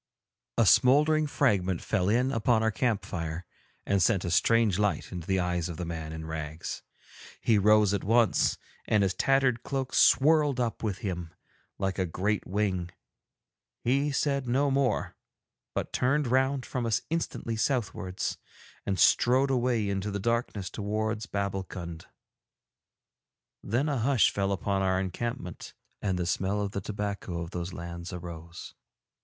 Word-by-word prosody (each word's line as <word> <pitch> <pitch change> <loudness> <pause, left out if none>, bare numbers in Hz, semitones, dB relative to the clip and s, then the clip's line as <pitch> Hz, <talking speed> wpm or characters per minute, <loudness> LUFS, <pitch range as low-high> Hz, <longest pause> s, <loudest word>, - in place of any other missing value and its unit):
A 115 - +4
smouldering 150 - +5
fragment 95 - +1
fell 95 +1 0
in 125 +4 +2
upon 115 -2 +2
our 110 - +2
camp 115 -2 0
fire 80 +1 -4 0.4
and 100 -1 +2
sent 95 0 +2
a 85 - -2
strange 105 +2 +3
light 105 -1 0
into 90 -3 -6
the 95 -1 +1
eyes 90 -1 -1
of 85 - -6
the 90 - -4
man 80 -2 -5
in 80 0 -6
rags. 80 0 -5 0.6
He 110 -3 +3
rose 105 0 +5
at 100 - -1
once, 115 0 +3 0.3
and 105 -2 +3
his 95 -1 +1
tattered 135 -2 +2
cloak 135 -2 -3
swirled 145 -2 +4
up 120 -2 -1
with 105 -4 -2
him 90 -4 -4 0.4
like 95 0 -2
a 95 - +1
great 100 +5 -1
wing; 95 -3 -1 0.9
he 140 +4 +2
said 140 -2 0
no 135 +3 +2
more, 135 -4 0 0.6
but - - -3
turned 140 +4 +2
round 130 +2 +1
from 125 -3 -3
us 110 - 0
instantly 165 -8 -2
southwards, 110 -6 -2 0.5
and 95 -1 0
strode 130 +7 +4
away 120 -4 +1
into 100 +1 -2
the 100 - -2
darkness 115 -2 -1
towards 110 +1 -2
Babbulkund. 95 -4 -4 1.5
Then 120 +8 0
a 140 -4 0
hush 125 0 +3
fell 100 0 -1
upon 100 0 0
our 95 -1 +2
encampment, 95 0 -5 0.3
and 95 -3 0
the 90 - -1
smell 95 +4 0
of 100 -1 -2
the 100 - -3
tobacco 100 -4 -4
of 85 +1 -6
those 90 +1 -4
lands 85 0 -7
arose. 85 -1 -8
105 Hz, 150 wpm, -28 LUFS, 90-125 Hz, 1.5 s, smouldering